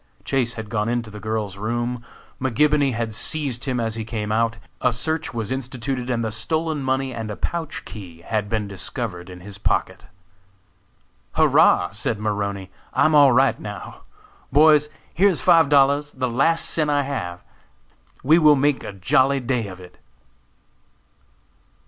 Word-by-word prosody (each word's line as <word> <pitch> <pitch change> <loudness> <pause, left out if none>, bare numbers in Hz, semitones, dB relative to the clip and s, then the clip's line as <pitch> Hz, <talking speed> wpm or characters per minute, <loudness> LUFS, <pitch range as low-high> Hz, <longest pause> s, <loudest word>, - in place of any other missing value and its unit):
Chase 125 -3 0
had 110 -2 -7
gone 105 0 0
into 120 -2 -2
the 105 - -9
girl's 105 -2 -3
room, 120 +3 -2 0.4
McGibony 140 +1 +2
had 115 -1 -3
seized 135 -1 -2
him 130 -3 -1
as 115 -1 -1
he 110 0 -4
came 105 -2 -4
out, 115 +1 +1 0.2
a 125 - +3
search 160 +6 -2
was 115 -2 -4
instituted 130 -1 -4
and 115 -2 0
the 110 - -2
stolen 155 +7 -2
money 130 0 -1
and 115 -2 -5
a 105 - -4
pouch 160 +6 -4
key 90 -6 -10
had 105 +2 -2
been 110 -2 -1
discovered 95 -1 -6
in 90 -1 -10
his 100 +2 -10
pocket. - - -1 1.3
"Hurrah!" 90 - +4
said 110 +1 -2
Maroney, 100 -3 -3 0.2
"I - - +3
am 155 - +3
all 145 -3 +7
right 130 +2 +3
now! 105 -1 -8 0.5
Boys, 150 +1 +5 0.2
here 200 +5 +4
is 180 - -1
five 165 -7 +5
dollars, 145 +1 +3
the 130 -1 -2
last 150 +8 +1
cent 155 -2 0
I 145 -1 +2
have! 90 -11 -5 0.8
We 155 +5 +5
will 150 -2 +6
make 145 0 +1
a - - -6
jolly 135 +8 +2
day 125 -3 -1
of 95 -1 -9
it." 90 -1 -14
120 Hz, 160 wpm, -22 LUFS, 105-140 Hz, 1.3 s, all